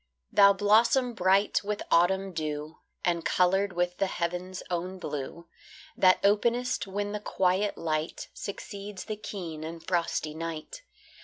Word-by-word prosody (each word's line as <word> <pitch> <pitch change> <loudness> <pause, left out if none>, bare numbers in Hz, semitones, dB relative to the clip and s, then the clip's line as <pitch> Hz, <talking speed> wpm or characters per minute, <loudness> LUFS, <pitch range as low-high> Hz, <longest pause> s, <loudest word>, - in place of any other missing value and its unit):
Thou 200 0 +7
blossom 230 +5 +3
bright 195 +1 +2
with 210 0 -3
autumn 190 +3 +3
dew, 155 -1 -4 0.3
And 170 -1 +1
coloured 190 +2 +2
with 175 0 -1
the 195 - +2
heaven's 180 +1 -3
own 180 +2 -2
blue, 165 0 -5 0.5
That 185 -1 +5
openest 235 +4 +2
when 205 +1 -3
the 210 - -3
quiet 190 0 0
light 155 -1 -2
Succeeds 200 0 -7
the 215 - -3
keen 175 -7 -6
and 165 +1 -7
frosty 170 -3 -1
night. 165 - -6
185 Hz, 135 wpm, -28 LUFS, 170-205 Hz, 0.5 s, Thou